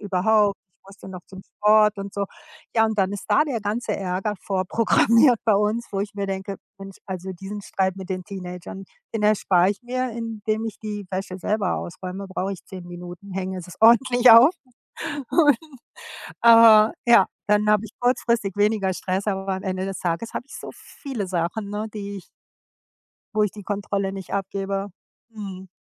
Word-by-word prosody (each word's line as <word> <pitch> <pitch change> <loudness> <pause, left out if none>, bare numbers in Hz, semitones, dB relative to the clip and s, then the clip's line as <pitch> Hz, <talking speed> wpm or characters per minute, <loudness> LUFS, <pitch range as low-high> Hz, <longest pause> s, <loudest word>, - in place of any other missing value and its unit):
überhaupt, 205 +1 +2 0.2
ich - - -84
musste 195 -1 -13
noch 180 -2 -9
zum 190 0 -11 0.2
Sport“, 210 0 +4
und 195 0 -6
so. 200 0 -1 0.5
Ja, 225 - +5
und 220 -1 -3
dann 195 +1 +2
ist 205 - -6
da 210 +7 +4
der 255 -7 -3
ganze 210 +1 -2
Ärger 195 +2 -2
vorprogrammiert 230 +5 +3
bei 220 - +5
uns, 210 +3 0
wo 195 - -1
ich 205 +1 -4
mir 200 -1 -3
denke: 195 +1 -4 0.2
„Mensch, 195 -1 -10
also 190 -1 -5
diesen 195 +3 -7
Streit 190 -1 -1
mit 190 -1 -8
den 185 -1 -2
Teenagern, 180 0 -8 0.3
den 220 - -1
erspare 195 -3 +3
ich 200 -1 -5
mir, 255 +1 -2
indem 220 -1 -3
ich 225 - -7
die 210 -2 -5
Wäsche 185 0 -4
selber 205 0 -1
ausräume, 185 +3 -6
brauche 190 +1 -3
ich 190 - -9
10 185 -2 -9
Minuten, 175 +2 -10
hänge 190 0 -3
es 180 -1 -9
ordentlich 245 +2 +6
auf.“ 235 +8 +9 0.8
Und, 295 -6 +5 0.9
äh, 225 -2 +8 0.2
ja, 200 -5 +7 0.2
dann 210 0 +3
habe 210 0 +3
ich 220 - -9
kurzfristig 235 -5 +1
weniger 205 -2 +1
Stress, 190 +3 -3
aber 195 -1 -1
am 190 - -6
Ende 185 -1 -2
des 195 - -5
Tages 175 +6 -3
habe - - -4
ich - - -9
so - - -8
viele 255 -9 -7
Sachen, 180 +4 -2
ne, 210 +1 -3
die 200 -1 -6
ich 185 - -16 1.1
Wo 215 - +3
ich 210 - 0
die 210 - -11
Kontrolle 200 -1 -2
nicht 195 -1 -7
abgebe. 195 0 -2 0.4
Mhm. 195 -4 -8
200 Hz, 180 wpm, -23 LUFS, 190-220 Hz, 1.1 s, auf